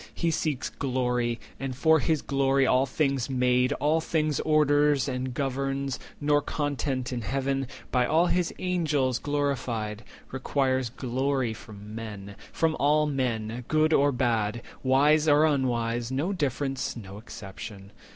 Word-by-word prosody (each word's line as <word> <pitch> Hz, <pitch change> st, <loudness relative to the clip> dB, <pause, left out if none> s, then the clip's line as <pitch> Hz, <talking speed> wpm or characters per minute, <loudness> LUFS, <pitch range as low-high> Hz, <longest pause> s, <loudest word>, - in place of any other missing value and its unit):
He 170 Hz, -1 st, 0 dB
seeks 150 Hz, -4 st, -1 dB
glory, 125 Hz, -3 st, 0 dB, 0.3 s
110 -, -, -7 dB
And 130 Hz, -, -5 dB
for 160 Hz, +4 st, +4 dB
his 155 Hz, +2 st, 0 dB
glory 135 Hz, -1 st, +2 dB
all 130 Hz, +1 st, +3 dB
things 135 Hz, -2 st, 0 dB
made, 125 Hz, 0 st, +2 dB
all 155 Hz, +3 st, +1 dB
things 155 Hz, -3 st, 0 dB
Orders 145 Hz, -2 st, +3 dB
and 130 Hz, -1 st, -2 dB
governs; 135 Hz, 0 st, -2 dB, 0.2 s
nor 145 Hz, 0 st, +3 dB
content 140 Hz, -3 st, -2 dB
in 120 Hz, -, -3 dB
Heaven, 135 Hz, +4 st, -1 dB, 0.2 s
By 125 Hz, -1 st, +2 dB
all 165 Hz, +3 st, +4 dB
his 180 Hz, -1 st, +1 dB
Angels 150 Hz, -8 st, 0 dB
glorified, 125 Hz, -7 st, -2 dB, 0.3 s
requires 130 Hz, -1 st, 0 dB
Glory 130 Hz, 0 st, -1 dB
from 105 Hz, -1 st, -11 dB
men, 105 Hz, -3 st, -7 dB, 0.2 s
from 160 Hz, -1 st, +1 dB
all 150 Hz, +2 st, +3 dB
men, 125 Hz, -4 st, -2 dB
good 155 Hz, +1 st, +3 dB
or 145 Hz, 0 st, +4 dB
bad, 115 Hz, -3 st, 0 dB, 0.2 s
Wise 145 Hz, +4 st, +4 dB
or 150 Hz, +1 st, +6 dB
unwise, 120 Hz, -4 st, 0 dB
no 150 Hz, +9 st, 0 dB
difference, 135 Hz, -6 st, -2 dB
no 100 Hz, -2 st, -9 dB
exemption. 100 Hz, -2 st, -9 dB
135 Hz, 140 wpm, -27 LUFS, 125-145 Hz, 0.3 s, or